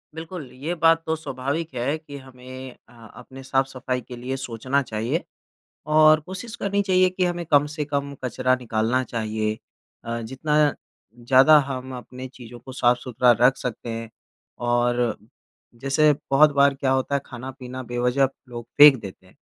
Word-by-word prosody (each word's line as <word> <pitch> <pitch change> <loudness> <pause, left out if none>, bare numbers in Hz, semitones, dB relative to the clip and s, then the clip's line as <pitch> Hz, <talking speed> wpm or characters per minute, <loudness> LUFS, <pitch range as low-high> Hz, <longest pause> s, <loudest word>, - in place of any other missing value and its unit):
बिल्कुल 160 -4 -7
ये 145 +7 -4
बात 165 0 +3
तो 160 - 0
स्वाभाविक 145 +1 -4
है 125 +5 -1
कि 145 -3 -11
हमें 130 -1 -11
अ, - - -19 0.2
अपने 135 0 -12
साफ़-सफ़ाई 130 -1 -1
के 125 +1 -10
लिए 125 +2 -4
सोचना 130 +2 -1
चाहिए, 120 +7 -2 0.6
और 155 0 +5
कोशिश 190 +8 -8
करनी 200 0 0
चाहिए 185 -2 +3
कि 185 0 -1
हमें 175 -1 -2
कम 145 -1 +4
से 150 -2 -2
कम 140 -1 -3
कचरा 130 +1 +1
निकालना 120 +1 0
चाहिए। 110 -2 -3 0.5
अ, 115 0 -3
जितना 135 +6 -2 0.7
ज़्यादा 135 +4 +7
हम 130 0 -5
अपनी 125 +2 -9
चीज़ों 120 -2 -12
को 125 +3 -11
साफ़-सुथरा 125 -1 +2
रख 125 +2 +5
सकते 120 -1 -5
हैं 115 0 -6 0.6
और 120 -1 +1 0.6
जैसे 150 +2 +3 0.2
बहुत 150 +2 +6
बार 140 0 +4
क्या 135 -1 -1
होता 130 +1 0
है 140 - +1
ख़ाना-पीना 130 +1 -8
बेवज़ह 125 +3 +2 0.2
लोग 120 -1 -7
फ़ेंक 145 -2 +10
देते 95 -2 -10
हैं, 95 - -23
130 Hz, 155 wpm, -23 LUFS, 125-150 Hz, 0.7 s, फ़ेंक